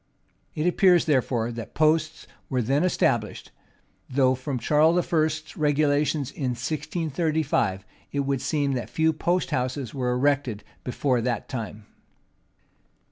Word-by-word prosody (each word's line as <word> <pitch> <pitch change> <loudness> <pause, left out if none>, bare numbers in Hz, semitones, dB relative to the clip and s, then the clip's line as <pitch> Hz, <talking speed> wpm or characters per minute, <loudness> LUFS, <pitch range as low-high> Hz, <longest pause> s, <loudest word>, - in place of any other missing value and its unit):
It 155 - -1
appears, 180 -1 +4
therefore, 125 -6 +1
that 115 -2 -8
posts 155 +1 +1 0.2
were 130 -3 0
then 140 +7 +1
established; 120 -11 0 0.6
though 130 -1 +3
from 130 +1 -3
Charles 155 +6 +3 0.2
I.'s 155 -1 0
regulations 145 -1 +1
in 130 -4 -2
1635, 150 - -1 0.3
it 140 - 0
would 135 -2 -1
seem 145 -3 0
that 125 -3 -3
few 160 0 +2
post 175 +4 0
houses 125 -1 -2
were 125 -2 -1
erected 125 -4 0 0.2
before 125 0 0
that 120 -2 -2
time. 110 -3 -6
140 Hz, 125 wpm, -25 LUFS, 125-155 Hz, 0.6 s, appears